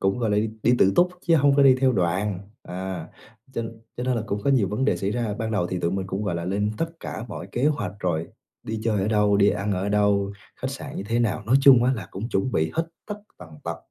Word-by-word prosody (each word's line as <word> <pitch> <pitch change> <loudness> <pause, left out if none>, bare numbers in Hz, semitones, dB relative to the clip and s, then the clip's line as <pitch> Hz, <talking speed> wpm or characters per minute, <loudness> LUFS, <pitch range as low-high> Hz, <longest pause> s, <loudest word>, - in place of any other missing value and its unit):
cũng, 95 +4 +1
gọi 115 -3 0
là, 105 - +2 0.3
đi 120 - +4
tự 95 0 +5
túc 180 - +5 0.2
chứ 165 - +5
hông 140 -1 +4
có 140 - +6
đi 135 -1 +7
theo 130 -1 +4
đoàn, 95 +1 0 0.2
à, 90 -2 -5 0.4
cho 115 - -2 0.3
cho 125 - -3
nên 130 -1 +1
là 115 - -1
cũng 100 0 -2
có - - +3
nhiều 115 -9 +3
vấn 105 +6 -1
đề - - +2
xảy 100 - -2
ra. 115 -2 -1
Ban 110 -1 -2
đầu 105 -5 0
thì 90 0 -3
tụi 85 - 0
mình 95 0 -2
cũng, 100 +2 -3
gọi 95 -4 -1
là, 85 - -3
lên 100 +3 0
tất 165 0 -1
cả 110 - -5
mọi 95 -4 -6
kế 125 - 0
hoạch 145 -10 0
rồi: 85 -3 -1 0.3
đi 110 0 -4
chơi 110 -4 +1
ở 100 - 0
đâu, 105 -2 +3
đi 100 0 +5
ăn 100 +1 -1
ở 95 +1 -1
đâu, 100 -1 +2 0.2
khách - - -4
sạn - - -7
như - - -3
thế 115 +4 -1
nào, 110 -3 0
nói 130 +5 +5
chung 130 -3 +7
á 130 - +3
là 115 - -4
cũng 105 +5 -5
chuẩn 125 +3 -1
bị 80 0 +1
hết 165 +1 0 0.2
tất 210 - -4 0.2
tần 90 -3 -11 0.2
tật. - - -3
105 Hz, 270 wpm, -24 LUFS, 95-120 Hz, 0.4 s, đi